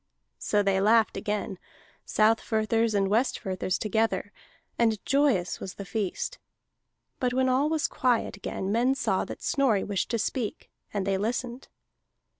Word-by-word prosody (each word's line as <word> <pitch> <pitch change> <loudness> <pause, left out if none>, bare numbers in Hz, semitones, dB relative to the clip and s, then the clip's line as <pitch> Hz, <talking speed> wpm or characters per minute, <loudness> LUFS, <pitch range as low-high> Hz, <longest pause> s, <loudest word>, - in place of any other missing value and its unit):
So 205 -1 +1
they 195 -1 +2
laughed 220 +2 +4
again, 205 -3 -3 0.5
Southfirthers 220 0 +2
and 195 -1 +2
Westfirthers 195 -4 0
together, 215 -2 0 0.4
and 225 -2 +2
joyous 270 -11 +2
was 185 - -7
the 200 - -7
feast. 215 - -3 0.8
But 250 -1 0
when 260 0 +3
all 265 +4 +2
was 315 -1 +1
quiet 245 -2 0
again, 195 -1 -4
men 245 +5 +2
saw - - 0
that - - -8
Snorri 255 -9 +2
wished 200 -3 -2
to 235 - 0
speak, 225 0 -3 0.2
and 200 -2 -2
they 195 -1 0
listened. 240 +4 -3
220 Hz, 140 wpm, -27 LUFS, 200-245 Hz, 0.8 s, laughed